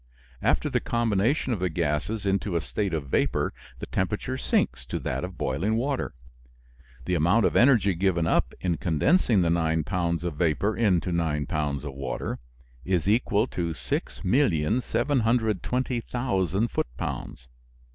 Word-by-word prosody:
After - - +2
the - - +1
combination 115 +4 +1
of 105 - -2
the 90 0 0
gases 85 +7 -1
into 100 -1 0
a 85 - +2
state 100 +4 -2
of 80 -4 -2
vapor - - +1 0.2
the - - -6
temperature 105 +7 -2
sinks 65 - 0
to - - -2
that - - -3
of - - -6
boiling 85 +12 0
water. 130 - -1 0.9
The 90 - -1
amount 90 +7 +3
of - - +1
energy 115 -6 +5
given 85 -1 +1
up - - +2
in 90 -3 0
condensing 100 - +2
the 85 - +2
nine 80 -1 +1
pounds 85 0 -1
of 85 -4 -3
vapor 90 +6 +1
into 95 -5 +2
nine 80 -4 0
pounds 75 -1 -2
of 70 - -5
water 70 +1 -4 0.4
is 90 -2 0
equal 110 0 +2
to 85 -2 -2
6,720,000 115 - 0
foot - - -1
pounds. 65 - -5
95 Hz, 145 wpm, -26 LUFS, 80-115 Hz, 0.9 s, energy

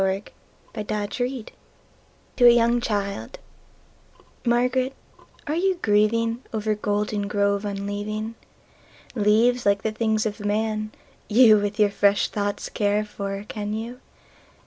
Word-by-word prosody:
Spring 195 +1 0 0.5
and 215 -2 -6 0.2
Fall 245 -2 -2 0.9
to 245 - +6
a - - +11
young 235 0 +4
childMÁRGARÉT, 240 - -3 0.5
áre 320 +3 -1
you 380 0 +2
gríevingOver 220 +1 +1
Goldengrove 205 -1 0
unleaving? 205 +2 -4 0.8
Leáves, 230 +3 +3
líke 200 -1 -3
the 220 - 0
things 220 0 0
of 215 0 -3
man, 215 +1 -1 0.4
youWith 215 -3 +5
your 210 -2 +3
fresh 200 0 +2
thoughts 205 -1 -3
care 205 0 0
for, 200 -1 -5
can 210 -1 -4
you? 235 +3 -6
215 Hz, 105 wpm, -24 LUFS, 205-235 Hz, 0.9 s, a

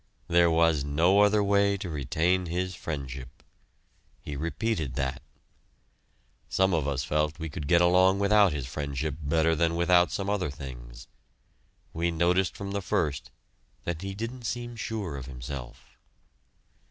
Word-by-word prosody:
There 85 0 +4
was 80 -3 +3
no 80 +8 +3
other 105 0 +4
way 100 0 +3
to 95 -1 -6
retain 85 +4 0
his 90 +2 -2
friendship. 70 -6 -7 0.8
He 75 - -7
repeated 80 - -2
that. 65 -1 -2 1.3
Some 95 0 +2
of 80 -4 +1
us 70 -2 -1
felt 75 +2 0
we 80 -1 -5
could 75 -4 -5
get 85 +2 +5
along 90 +2 +5
without 100 -1 +4
his 70 -4 -3
friendship 70 +2 -3
better 80 +2 +2
than 85 +1 +1
without 90 +1 +4
some 100 - -3
other 100 -5 0
things. - - -9 0.9
We 85 +1 0
noticed 90 +2 +1
from 100 -1 -5
the 100 0 -2
first 75 -6 -1 0.5
that 85 -1 -3
he 95 0 -5
didn't 115 +3 -6
seem 120 +1 -4
sure 105 -9 -4
of 65 - -7
himself. 65 -1 -8
85 Hz, 145 wpm, -28 LUFS, 70-95 Hz, 1.3 s, get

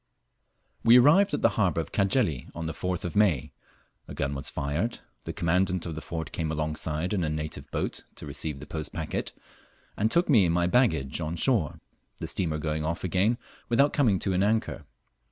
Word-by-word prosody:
We 115 +2 +8
arrived 160 +11 +6
at - - -5
the - - +6
harbour 90 -5 +2
of 80 - -4
Cajeli 100 - +1
on 80 0 -4
the 80 - -3
4th 90 -1 -3
of 90 - -4
May; 100 -10 +2 0.6
a - - -8
gun 70 +1 -1
was 70 -1 -3
fired, 80 +12 -2 0.3
the - - -3
Commandant 90 +1 +1
of 85 - -4
the 80 - -6
fort 80 -1 -5
came 80 -2 -2
alongside 80 +3 -2
in 95 -4 0
a 80 - 0
native 75 0 -5
boat - - -3
to - - -8
receive 70 0 -3
the 75 - -8
post 80 -1 -5
packet, - - -3 0.6
and 110 +2 +1
took 170 +8 +2
me 115 - +5
and 85 0 +1
my 85 0 +2
baggage 85 - +2
on 80 +1 -2
shore, 95 - 0 0.4
the - - -5
steamer 80 -1 0
going 75 0 -2
off 80 +2 -2
again 95 +6 +2 0.3
without 140 +5 +4
coming 120 -10 +3
to 95 +1 -1
an 90 - +2
anchor. 110 +2 0
85 Hz, 195 wpm, -27 LUFS, 75-105 Hz, 0.6 s, We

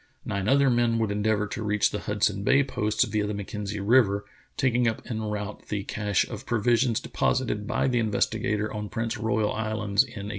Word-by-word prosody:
Nine 100 0 -2
other 140 -1 +4
men 120 -1 +2
would 110 -2 0
endeavor 105 +1 +1
to 105 +2 -5
reach 105 -1 +1
the 105 - -3
Hudson 105 -1 0
Bay 135 +6 +4
posts 105 -5 0
via 105 -1 -1
the 105 - -3
Mackenzie 105 +1 -5
River, 100 -2 +3 0.3
taking 125 -2 +2
up 110 - -2
en 110 -3 -4
route 105 -1 -5
the 100 -2 -2
cache 105 -2 0
of 115 +2 -8
provisions 120 +1 +2
deposited 105 -5 -1
by 125 - +1
the 125 -2 +1
Investigator 110 0 0
on 105 -1 -4
Prince 115 0 -2
Royal 110 -1 0
Islands 110 -2 +1
in 130 - -12 0.2
1850. - - -5
110 Hz, 190 wpm, -26 LUFS, 105-115 Hz, 0.3 s, other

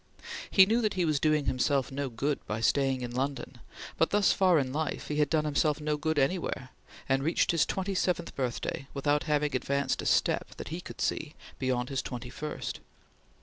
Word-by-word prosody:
He 190 - +7
knew 225 +4 +2
that 215 -3 0
he 180 -2 +1
was 155 -3 +1
doing 155 -1 +2
himself 135 +1 +1
no 140 0 -2
good 140 +5 -2
by 105 - -2
staying 135 +2 +2
in 120 -1 -4
London, 135 +2 -3 0.4
but 165 - +4
thus 205 -1 +4
far 185 -3 +4
in 130 -3 0
life 155 -1 -3
he 150 - -1
had 150 -2 +3
done 155 -1 +1
himself 150 0 +1
no 150 0 0
good 160 +1 -1
anywhere, 140 -3 0 0.4
and 135 0 +2
reached 160 +5 +2
his 165 -2 +2
twenty 195 +1 -2
seventh 180 -2 -1
birthday 130 +1 -3
without 145 +1 +1
having 150 -2 +1
advanced 140 +2 0
a - - -3
step, - - +1
that - - -7
he 170 +3 -4
could - - -9
see, 150 0 -1 0.2
beyond 125 -2 0
his 135 -2 -1
twenty 125 0 -6
first. 150 +2 -5
145 Hz, 195 wpm, -29 LUFS, 135-160 Hz, 0.4 s, He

